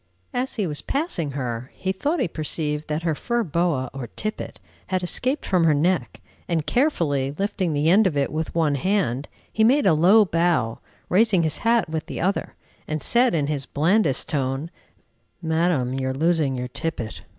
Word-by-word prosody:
As 255 +2 -2
he 210 - 0
was 150 -4 -2
passing 235 - -2
her, 125 -2 -4
he 190 - -2
thought 290 - -1
he - - +1
perceived 155 -1 -3
that 155 +2 -2
her 165 -2 +1
fur 235 +9 -1
boa 165 -6 0
or 135 -3 -6
tippet 215 - -5 0.3
had 185 -1 -1
escaped 255 +10 0
from 180 -3 +2
her 155 -2 +4
neck, 175 +5 0 0.3
and, 165 -4 0
carefully 150 - +1
lifting 195 -4 -1
the 145 +1 +1
end 195 +5 +5
of 155 -6 -2
it 140 - 0
with 160 +2 -3
one 160 -3 +2
hand, 145 - 0 0.3
he 220 - +2
made 270 +6 +4
a 185 - +5
low 190 +8 +6
bow, 165 - +1 0.3
raising 195 -2 +3
his 155 - 0
hat 230 -2 +2
with 160 0 -4
the - - -5
other, 195 +4 -1 0.3
and 155 -2 -3
said 240 -3 +3
in 150 -3 +1
his 145 -2 -3
blandest 160 -1 +2
tone, 135 +3 -2 0.7
"Madam, 160 -6 0
you 130 0 -2
are 130 - -2
losing 155 -2 +1
your 125 0 -3
tippet!" 125 -3 -4
165 Hz, 185 wpm, -23 LUFS, 145-195 Hz, 0.7 s, low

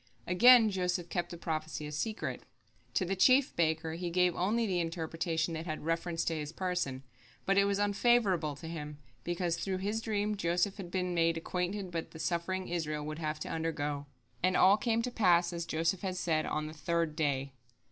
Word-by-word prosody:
Again 225 +4 +7
Joseph 180 -2 -1
kept 175 0 -2
the 170 - -7
prophecy 155 -2 -3
a 150 - -6
secret. 215 +9 -3 0.5
To 185 - +2
the 195 +2 -1
chief 260 +8 +4
baker 160 -1 0
he 175 +1 -3
gave 180 0 +2
only 220 +6 +1
the 185 -4 0
interpretation 165 0 -2
that 160 +2 -5
had 155 -1 -4
reference 165 0 -1
to 165 - 0
his 150 -1 -4
person, 170 -7 -2 0.4
but 195 - +2
it 200 0 +5
was 200 0 +1
unfavorable 205 -7 +2
to 160 - -9
him, 150 -3 -6 0.3
because 175 -1 -1
through 185 +3 -2
his 205 +4 -2
dream 210 -2 -1
Joseph 180 +1 0
had 190 -4 -7
been 180 0 -1
made 165 -1 +2
acquainted 180 +2 -3
with 165 -1 -3
the 160 - -9
suffering 180 +3 -2
Israel 155 -3 -2
would 155 +1 -5
have 155 -1 -3
to - - -4
undergo. 150 -3 -2 0.3
And 185 +1 +2
all 195 +2 +7
came 230 +1 0
to 250 - -2
pass, 175 -6 +3
as 170 -1 -4
Joseph 165 +3 0
had 185 -2 -3
said, 160 -3 0
on 155 0 -2
the 155 - -7
third 165 -1 -1
day. 140 -4 -1
175 Hz, 195 wpm, -32 LUFS, 160-190 Hz, 0.5 s, Again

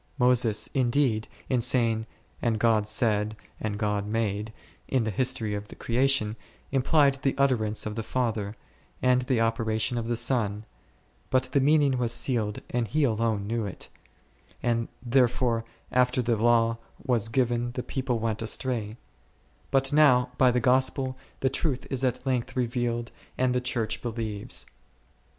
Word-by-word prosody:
Moses, 120 -4 +3
indeed, 125 -4 +1 0.2
in 125 -2 +1
saying, 115 -2 +1 0.3
And 115 -2 +1
God 110 -2 +2
said 105 -1 +1
— - - -32
and 105 -1 -2
God 105 -1 -1
made, 105 -1 -1 0.4
in 130 -3 +1
the 110 - -1
history 120 -2 0
of 105 0 -4
the - - -12
creation, 120 -3 +1 0.4
implied 140 +1 +3
the 135 0 +1
utterance 115 -6 +1
of 105 - -3
the 115 - -3
Father, 110 -3 -2 0.5
and 125 0 +4
the 125 -1 0
operation 115 +1 0
of 115 - -4
the 120 - 0
Son, 110 -3 +1 0.6
but 130 0 +3
the 140 - +3
meaning 140 -2 +3
was 120 -2 +1
sealed 115 -4 0
and 120 -2 0
he 150 +9 +1
alone 110 -4 +1
knew 115 0 -2
it, 95 - -8 0.7
and 115 -1 +1 0.2
therefore 125 -2 +2 0.3
after 125 0 +2
the 120 0 +1
Law 115 0 +3 0.3
was 120 -4 +1
given 120 0 0
the 125 - -3
people 130 -3 -2
went 110 -1 -2
astray; 115 -1 -2 0.7
but 135 +1 +2
now 130 -5 +5
by 130 - +6
the 125 0 +2
Gospel, 130 +1 +2 0.3
the 130 - +3
truth 140 -2 -1
is 135 -1 -1
at 130 0 -1
length 130 -1 -1
revealed 120 -1 -1 0.3
and 130 -1 +2
the 125 - +1
Church 120 -3 -2
believes. 110 -3 -4
120 Hz, 155 wpm, -27 LUFS, 110-130 Hz, 0.7 s, by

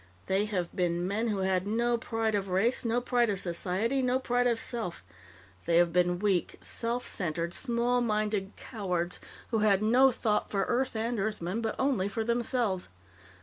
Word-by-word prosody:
They 195 +2 +1
have 185 -5 -3
been 175 -1 0
men 215 +4 -1
who 205 -3 -1
had 190 0 0
no 235 +3 +1
pride 225 -1 -1
of 200 -1 0
race, 210 +9 +1
no 235 +1 +1
pride 245 -2 +2
of 200 -2 0
society, 195 +8 0
no 255 0 +2
pride 245 -1 +1
of 235 -2 +1
self. 225 -9 -3 0.6
They 170 0 +4
have 170 -1 +4
been 180 0 +2
weak, 195 -2 0
self 240 +1 -3
centered, 170 -1 -2
small 245 0 +1
minded, 210 -3 -1
cowards 180 -6 -3 0.3
who 225 - +2
had 210 -1 +3
no 255 +5 +5
thought 215 -3 0
for 195 -1 0
Earth 250 0 0
and 225 +1 -1
Earthmen, 210 0 -2
but 220 -1 -2
only 260 -8 +1
for 220 +2 -2
themselves. 235 -4 0
215 Hz, 175 wpm, -29 LUFS, 185-235 Hz, 0.6 s, no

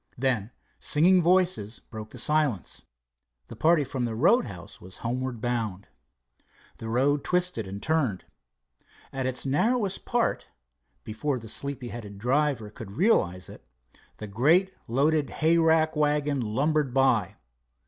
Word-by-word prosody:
Then 120 -5 0 0.3
singing 180 +5 +4
voices 175 - +2
broke 110 -1 -10
the - - -11
silence. 145 - 0 0.7
The - - -8
party 160 -1 +3
from 130 -2 -3
the 115 -2 -3
roadhouse 110 - 0
was 90 +1 -11
homeward 125 0 -3
bound. 115 -6 -2 0.9
The 110 - -7
road 140 +5 +1
twisted 180 - -1
and 100 +2 -7
turned. 140 - 0 0.9
At 135 -1 -2
its 130 +1 -2
narrowest 200 - 0
part, 240 -1 -1 0.6
before 130 +6 -2
the 115 -2 -10
sleepy 125 +3 -3
headed 105 -4 -8
driver 125 -1 0
could 110 -3 -10
realize 95 - +1
it, - - -13 0.5
the 105 - -7
great 155 - +2
loaded 145 +4 +1
hayrack 160 0 +2
wagon 150 -2 +1
lumbered 135 +4 0
by. 115 -8 +2
135 Hz, 130 wpm, -26 LUFS, 110-155 Hz, 0.9 s, singing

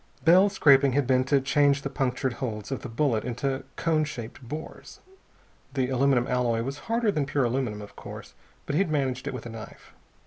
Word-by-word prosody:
Bell's 185 +4 +6
scraping 140 -6 +5
had 140 0 +2
been 130 0 +3
to 140 +1 +3
change 140 +1 +2
the 140 - -2
punctured 130 -1 -1
holes 110 -3 -4
of 135 - -3
the 125 - -7
bullet 115 -2 0
into 135 +2 -2
cone 160 -2 +1
shaped 125 -5 -7
bores. 150 +6 -8 0.8
The 130 -2 0
aluminum 130 -1 +2
alloy 120 -3 0
was 135 +3 -5
harder 230 -2 +2
than 150 -6 -1
pure 140 0 +1
aluminum, 120 -4 -1
of 105 - -13
course, - - -10 0.3
but - - -3
he 150 - +2
had 195 - +1
managed 135 -4 -1
it - - -3
with 120 - -7
a - - -6
knife. 110 -1 -11
135 Hz, 200 wpm, -27 LUFS, 125-145 Hz, 0.8 s, Bell's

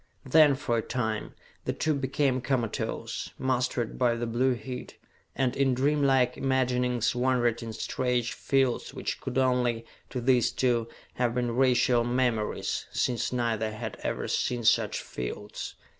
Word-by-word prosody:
Then, 150 +1 +6
for 120 -3 0
a - - 0
time, 110 -3 -3 0.3
the - - 0
two 155 - 0
became 135 -1 0
comatose, 125 -4 -2
mastered 125 -2 -1
by 120 -2 +3
the 120 0 -2
blue 125 +3 +1
heat, 125 +2 -7 0.4
and 130 -2 0
in 135 -2 +2
dreamlike 135 -2 +2
imaginings 125 -3 +1
wandered 125 -2 +1
in 115 -1 -5
strange 125 +2 -1
fields 135 -3 0
which - - -4
could 130 -1 -4
only, 125 -3 +2 0.2
to 125 - -3
these 125 -1 +3
two, 120 -3 +1 0.3
have 120 -1 0
been 120 -2 0
racial 125 -2 +3
memories, 120 -3 -1
since 120 -2 0
neither 115 -3 0
had 105 - -5
ever - - -2
seen 120 -1 -1
such - - +3
fields. - - -6
125 Hz, 145 wpm, -28 LUFS, 120-130 Hz, 0.4 s, Then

